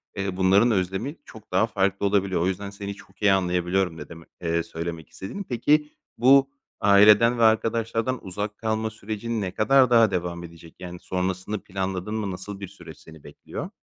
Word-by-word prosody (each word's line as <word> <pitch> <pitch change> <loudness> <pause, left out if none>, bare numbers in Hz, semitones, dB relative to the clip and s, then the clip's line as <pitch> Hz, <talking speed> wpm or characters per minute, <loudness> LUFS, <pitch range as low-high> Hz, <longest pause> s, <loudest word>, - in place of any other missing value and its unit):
eee, 95 -1 -3
bunların 95 +5 +4
özlemi 95 - -1
çok 110 -1 -14
daha 95 +5 +3
farklı 100 -2 0
olabiliyor. 100 -3 +1
O 90 - +1
yüzden 100 +1 -3
seni 100 0 -6
çok 95 -2 -19
iyi 100 -1 +5
anlayabiliyorum 90 -1 0
ne - - -9
demek 85 0 -12
eee, 85 -1 0
söylemek 85 -1 -6
istediğini. 200 - -7
Peki, 150 - +1 0.3
bu, 135 +3 +5 0.3
aileden 105 +4 +6
ve - - +3
arkadaşlardan 115 +2 +1
uzak 105 +3 -5
kalma 110 0 -1
sürecin 110 +1 -4
ne 95 -2 -3
kadar 130 +6 +4
daha 115 -4 +5
devam 85 -1 -3
edecek, 85 -1 -13
yani, 90 -1 -8
sonrasını 95 +2 -3
planladın 95 +1 -4
mı, 105 -3 -2
nasıl 95 +2 -7
bir 100 - -6
süreç 100 - -13
seni 80 -2 -15
bekliyor? 75 - -8
100 Hz, 175 wpm, -24 LUFS, 90-110 Hz, 0.3 s, aileden